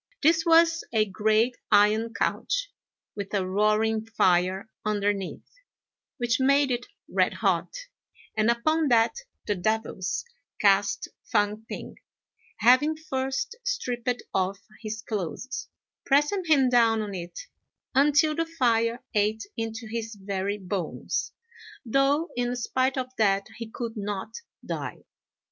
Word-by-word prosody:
This 320 +2 +4
was 330 0 +5
a 220 -2 +3
great 215 +4 +1
iron 215 +2 +4
couch, - - -1 0.4
with 200 -1 -5
a 190 -2 +1
roaring 215 +3 +2
fire 190 -3 +2 0.2
underneath, 205 -2 -1 0.7
which 240 0 +1
made 275 +1 +4
it 245 0 -2 0.2
red - - +1
hot; - - +1 0.6
and 215 +1 +2
upon 310 +7 +2
that 230 - +4 0.3
the 205 - +1
devils 200 - -2 0.3
cast 200 0 +3 0.2
Fang 210 +2 +1
p'ing, - - -7 0.6
having 255 +7 +5
first 270 - -3
stripped 245 - -2
off 190 +1 0 0.2
his 220 0 -5
clothes, 215 +5 -4 0.4
pressing 295 +7 +2
him 290 -5 +4
down 230 -3 +4
on 205 -1 -5
it, 175 -2 -6 0.5
until 295 +3 +4
the 330 +1 -1
fire 235 -6 +1
ate 215 +1 +1
into 225 0 -4
his 225 0 -5
very 200 0 -3
bones, 185 -3 -3 0.5
though 275 +7 +2
in 245 0 -1
spite 260 +2 0
of 255 0 -4
that 200 -2 +3
he 230 -1 -6
could 230 0 -5
not 205 +1 -4 0.3
die. - - -5
225 Hz, 120 wpm, -26 LUFS, 205-265 Hz, 0.7 s, was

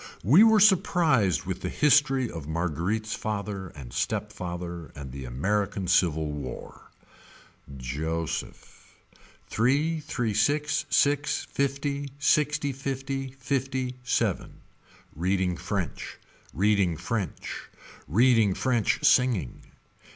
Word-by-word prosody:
We 150 - +7
were 220 -1 +6
surprised 165 - +3
with - - -5
the - - -3
history 135 -3 +3
of 80 -8 -8
Marguerite's 85 +7 -2
father 100 -3 -4
and 65 -5 -10
step - - -2
father 85 -2 -6
and 70 -2 -8
the 65 0 -7
American 95 +9 -1
Civil 80 -4 +2
War. 70 -4 -8 0.9
Joseph. 80 +6 -5 0.5
Three 145 +8 +1
three 120 -7 -2
six, 145 +7 +1
six, 145 0 +2
fifty, 140 +1 -2
six 150 0 +2
fifty, 135 -1 -4
fifty, 130 -1 -2
seven. 125 - -1 0.5
Reading 90 +2 0
french. 90 -4 -4 0.3
Reading 95 -3 +2
french. 95 0 -4 0.4
Reading 110 - +4
french 120 -4 0
singing. 120 - +2
110 Hz, 100 wpm, -27 LUFS, 85-140 Hz, 0.9 s, We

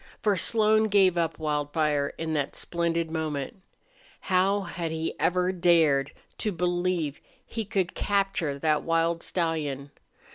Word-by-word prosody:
For 210 -2 +3
Slone 215 +3 +3
gave 195 -4 +4
up 165 -2 -1
Wildfire 150 -1 -1
in 160 -1 -3
that 145 -2 -1
splendid 170 -1 -1
moment. 155 +1 -3 0.6
How 195 +2 +2
had 170 -2 -4
he 160 0 -3
ever 180 +1 +2
dared 165 -6 +3 0.3
to 215 - 0
believe 175 -3 -1 0.2
he 225 -2 -4
could 195 -2 -1
capture 195 -8 0
that 155 +1 +1
wild 165 0 0
stallion? 150 -5 -2
170 Hz, 130 wpm, -27 LUFS, 155-185 Hz, 0.6 s, gave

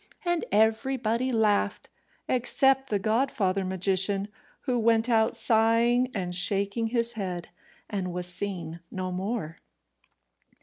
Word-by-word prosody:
And 345 -1 0
everybody 230 +3 +1
laughed, 210 -3 +1 0.4
except 265 +2 +2
the 210 - +1
godfather 215 -3 0
magician, 190 +2 +1 0.3
who 250 -3 -1
went 225 0 +3
out 225 -2 +2
sighing 230 +2 +3
and 180 -3 -3
shaking 200 +5 +1
his 235 0 -1
head, 180 -5 -5 0.4
and 190 -3 -3
was 180 0 -3
seen 175 -3 -4
no 185 -1 -4
more. 185 -3 -3
215 Hz, 115 wpm, -27 LUFS, 190-235 Hz, 0.4 s, went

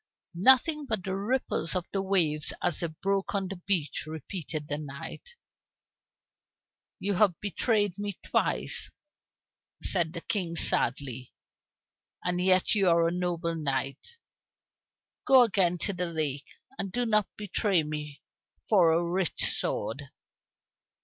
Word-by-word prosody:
"Nothing 265 - +5
but 220 -6 -1
the 190 -1 -3
ripples 200 -5 -1
of 180 -2 -1
the 195 - 0
waves 170 -6 +1
as 170 - 0
they 170 - -1
broke 195 +6 -2
on 195 -1 0
the 195 - -6
beach," 175 -6 -1
repeated 155 -1 -6
the 145 0 -3
knight. 150 - -8 1.6
"You 200 +1 -1
have 185 -3 +3
betrayed 205 0 0
me 205 -2 -4
twice," - - 0 0.9
said 170 -4 0
the 170 - -5
King 175 -5 -2
sadly, 130 -4 0 0.9
"and 180 0 0
yet 185 0 +3
you 195 -4 +3
are 170 0 +4
a - - 0
noble 175 -1 -1
knight! 140 - -3 1.1
Go 260 -2 +8
again 185 -5 +2
to 200 +4 -1
the 180 -1 -2
lake, 150 -4 -2 0.3
and 195 -1 -3
do 245 +4 -1
not 215 -3 +2
betray 205 -3 +1
me 150 -1 -6 0.4
for 185 -6 +5
a 165 +2 +2
rich 180 0 0
sword." 135 +6 -2
180 Hz, 130 wpm, -28 LUFS, 155-200 Hz, 1.6 s, Go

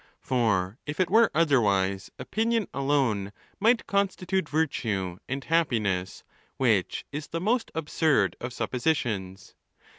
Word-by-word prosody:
For 110 -4 0
if 145 +3 -5
it 185 -1 +1
were 225 +1 +6
otherwise, 100 - +2
'opinion 220 - 0
alone 135 -8 0 0.3
might 230 +3 +3
constitute 190 -3 0
virtue 105 - -1
and 135 +1 -3
happiness, 110 - 0 0.3
which - - +1
is 150 +1 -5
the 165 - -3
most 225 +6 0
absurd 155 - +1
of 120 - -4
suppositions. 120 -9 -2
140 Hz, 115 wpm, -27 LUFS, 100-170 Hz, 0.3 s, were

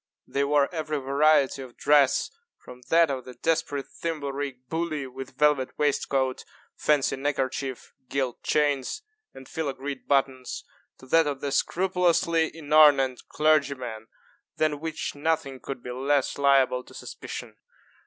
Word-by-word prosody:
They 140 - -1
wore 140 0 +3
every 155 -2 -2
variety 140 0 +3
of 130 -2 -11
dress, 145 -3 +3 0.3
from 125 0 -13
that 165 -2 +5
of 130 -2 -3
the 125 0 -11
desperate 155 -4 -1
thimble 155 -4 -4
rig 135 -3 -5
bully, 160 -3 -2
with 130 0 -9
velvet 150 -3 +2
waistcoat, 135 -3 0 0.3
fancy 150 -3 +2
neckerchief, 135 -2 -3 0.2
gilt 130 -3 -2
chains, 145 - 0 0.3
and 130 - -11
filagreed 140 -3 -4
buttons, 135 -2 0 0.3
to - - -15
that 160 +4 +3
of 140 -2 -2
the 140 - -2
scrupulously 175 -2 +2
inornate 145 -4 +4
clergyman, 140 -7 0 0.5
than 155 -2 +1
which 160 0 -4
nothing 145 -3 -1
could 135 -2 -7
be 125 - -6
less 135 +2 0
liable 135 -2 +3
to - - -15
suspicion. - - -8
140 Hz, 135 wpm, -26 LUFS, 130-155 Hz, 0.5 s, that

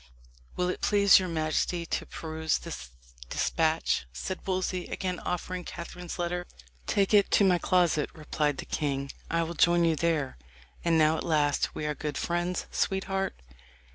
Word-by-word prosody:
"Will 180 - 0
it - - -3
please 200 -1 +6
your 185 -1 -3
majesty 165 +2 0
to - - -3
peruse 160 -1 -2
this 65 -2 -7 0.4
despatch?" 160 - +1
said 185 - -4
Wolsey, 185 -1 -1
again 185 -1 -3
offering 180 +1 -3
Catherine's 175 0 -7
letter. 175 0 -2 0.4
"Take 200 +1 +2
it 205 -1 +6
to - - +4
my 180 -3 +4
closet," 175 -5 +2
replied 150 -2 -1
the - - -5
king; 140 -2 -2 0.2
"I 165 0 +1
will 165 +1 -4
join 170 +1 +4
you 165 -1 +3
there. 150 - 0 0.4
And 170 -1 +3
now 155 0 +4
at - - -3
last 145 -3 +1
we 150 - -3
are 150 - 0
good 150 -1 -4
friends, 175 +1 -1
sweetheart." 195 - -1
170 Hz, 160 wpm, -29 LUFS, 155-180 Hz, 0.4 s, please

